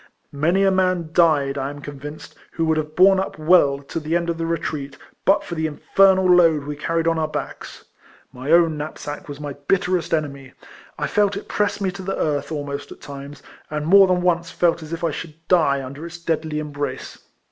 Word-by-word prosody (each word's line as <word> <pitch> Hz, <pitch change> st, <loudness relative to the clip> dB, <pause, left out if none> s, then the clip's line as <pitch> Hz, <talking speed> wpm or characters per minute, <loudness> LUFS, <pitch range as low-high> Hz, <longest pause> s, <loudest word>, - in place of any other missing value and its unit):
Many 170 Hz, +7 st, +2 dB
a 195 Hz, -, +4 dB
man 185 Hz, -3 st, +1 dB
died, 145 Hz, -5 st, +3 dB
I 135 Hz, +1 st, -2 dB
am 145 Hz, 0 st, -8 dB
convinced, 145 Hz, +1 st, -9 dB, 0.2 s
who 165 Hz, -, 0 dB
would 160 Hz, 0 st, +2 dB
have 155 Hz, 0 st, -3 dB
borne 190 Hz, +1 st, +6 dB
up 190 Hz, -, -4 dB
well 155 Hz, -3 st, +4 dB
to 155 Hz, -, -5 dB
the 160 Hz, +1 st, -2 dB
end 170 Hz, 0 st, 0 dB
of 165 Hz, -, -6 dB
the 165 Hz, -, -1 dB
retreat, 150 Hz, -4 st, -3 dB, 0.3 s
but 195 Hz, +2 st, +4 dB
for -, -, -7 dB
the 160 Hz, -1 st, -1 dB
infernal 190 Hz, +5 st, +3 dB
load 170 Hz, -5 st, +5 dB
we 145 Hz, +1 st, -5 dB
carried 165 Hz, +2 st, -1 dB
on 165 Hz, -1 st, +2 dB
our 155 Hz, -, 0 dB
backs. 155 Hz, -, -7 dB, 0.5 s
My 130 Hz, +4 st, -4 dB
own 165 Hz, -2 st, +4 dB
knapsack 150 Hz, +2 st, -6 dB
was 145 Hz, 0 st, -7 dB
my 145 Hz, -1 st, -5 dB
bitterest 185 Hz, -3 st, +1 dB
enemy; 140 Hz, -4 st, -3 dB, 0.4 s
I -, -, -1 dB
felt 205 Hz, -1 st, +1 dB
it 200 Hz, -, -8 dB
press 205 Hz, 0 st, -1 dB
me 195 Hz, -2 st, -1 dB
to 195 Hz, +1 st, -9 dB
the 195 Hz, +1 st, -3 dB
earth 145 Hz, -2 st, -1 dB
ahnost 145 Hz, -2 st, -5 dB
at -, -, -11 dB
times, 140 Hz, 0 st, -10 dB, 0.3 s
and 150 Hz, 0 st, -3 dB
more 195 Hz, +3 st, +7 dB
than 180 Hz, -1 st, +1 dB
once 170 Hz, -1 st, +1 dB
felt 170 Hz, -2 st, +1 dB
as 155 Hz, 0 st, -10 dB
if 165 Hz, 0 st, -5 dB
I 165 Hz, -, +1 dB
should 155 Hz, +1 st, -7 dB
die 140 Hz, -6 st, +3 dB
under 140 Hz, +4 st, -9 dB
its 170 Hz, 0 st, -9 dB
deadly 160 Hz, -2 st, -2 dB
embrace. 145 Hz, -3 st, -5 dB
160 Hz, 210 wpm, -22 LUFS, 145-175 Hz, 0.5 s, more